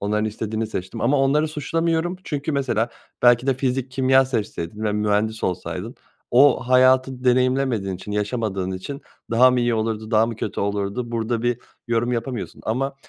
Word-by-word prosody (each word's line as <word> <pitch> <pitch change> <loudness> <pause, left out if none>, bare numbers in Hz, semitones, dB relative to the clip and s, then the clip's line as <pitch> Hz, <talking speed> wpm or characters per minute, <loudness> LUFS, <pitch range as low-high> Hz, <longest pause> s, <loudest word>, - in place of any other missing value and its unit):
onların 105 +1 0
istediğini 110 +1 -3
seçtim 95 -3 -5
ama 135 +5 +2
onları 145 +3 +2
suçlamıyorum." 165 +3 -1
Çünkü 145 0 -3
mesela 120 -5 0 0.3
belki 120 +1 +5
de 135 - +3
fizik 130 0 -1
kimya 130 0 +4
seçseydin 105 -5 -4
ve 105 - +1
mühendis 105 +1 0
olsaydın 90 0 -4 0.4
o 135 +2 +5
hayatı 130 0 +4
deneyimlemediğin 125 -5 +2
için 105 +3 -8
yaşamadığın 105 -3 -2
için 135 +10 -6 0.3
daha 125 +2 +6
mı 125 -1 +1
iyi 120 -1 +1
olurdu, 110 0 -2
daha 110 -1 +4
mı 115 -2 -5
kötü 105 - -4
olurdu 100 +4 -2
burada 115 0 -1
bir 120 -1 0 0.3
yorum 120 +1 +1
yapamıyorsun 120 0 -4
ama 135 +5 -1
120 Hz, 160 wpm, -22 LUFS, 105-130 Hz, 0.4 s, daha